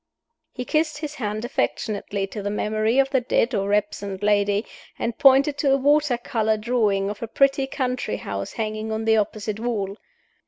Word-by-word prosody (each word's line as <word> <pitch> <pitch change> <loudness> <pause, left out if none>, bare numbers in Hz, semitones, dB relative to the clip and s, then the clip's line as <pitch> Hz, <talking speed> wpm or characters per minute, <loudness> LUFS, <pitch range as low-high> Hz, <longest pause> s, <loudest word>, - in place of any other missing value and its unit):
He 250 - -6
kissed 310 0 0
his 300 0 -5
hand 215 -5 -3
affectionately 205 -5 -2
to 205 +2 -7
the 200 - -2
memory 215 +3 0
of 270 0 +3
the 265 -2 +2
dead 240 0 +1
or 200 -1 0
absent 205 -1 -1
lady, 205 0 +2 0.3
and 235 - -2
pointed 275 +2 +5
to 275 -2 +3
a - - +4
water 285 -1 +3
color 220 -2 0
drawing 210 -3 +1
of 210 - -9
a 230 - -3
pretty 275 +3 +2
country 255 -4 -2
house 100 0 -5
hanging 215 0 -3
on 220 0 -2
the 220 0 +4
opposite 215 0 -2
wall. 210 -4 -2
220 Hz, 180 wpm, -23 LUFS, 205-265 Hz, 0.3 s, pointed